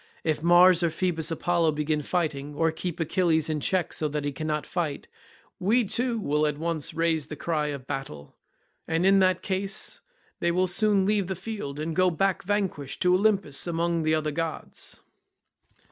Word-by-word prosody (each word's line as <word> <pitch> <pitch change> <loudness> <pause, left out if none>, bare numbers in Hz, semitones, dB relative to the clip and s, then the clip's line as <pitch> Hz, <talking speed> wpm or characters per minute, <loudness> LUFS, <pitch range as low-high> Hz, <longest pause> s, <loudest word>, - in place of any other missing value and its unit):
If 155 -2 0
Mars 175 +1 +6
or 170 - +2
Phoebus 165 -1 -1
Apollo 165 -1 +1
begin 150 0 -1
fighting, 150 -3 -2
or 165 +2 +2
keep 170 +1 -5
Achilles 160 -1 +1
in 155 - -1
check 180 +3 0
so 155 - -1
that 150 0 -3
he 145 - -1
cannot 150 +1 -3
fight, 160 -6 -3 0.5
we 225 +7 +3
too, 240 +4 0
will 150 -4 +1
at 150 -1 -2
once 160 -1 -3
raise 160 -3 +1
the 150 - -6
cry 150 0 -1
of 140 -3 -5
battle, 135 - -6 0.5
and 165 +2 +1
in 195 0 +6
that 185 -1 +2
case 195 +1 -3 0.4
they 170 - +1
will 180 +2 +2
soon 200 +1 +2
leave 205 -2 +1
the 190 - -2
field 185 -8 -6
and 160 +1 -3
go 185 0 +4
back 190 +3 0
vanquished 190 -8 -2
to 180 0 +4
Olympus 190 -7 +1
among 170 0 0
the 155 0 +2
other 155 -1 -1
gods." 165 +1 -5
165 Hz, 175 wpm, -26 LUFS, 150-185 Hz, 0.5 s, Mars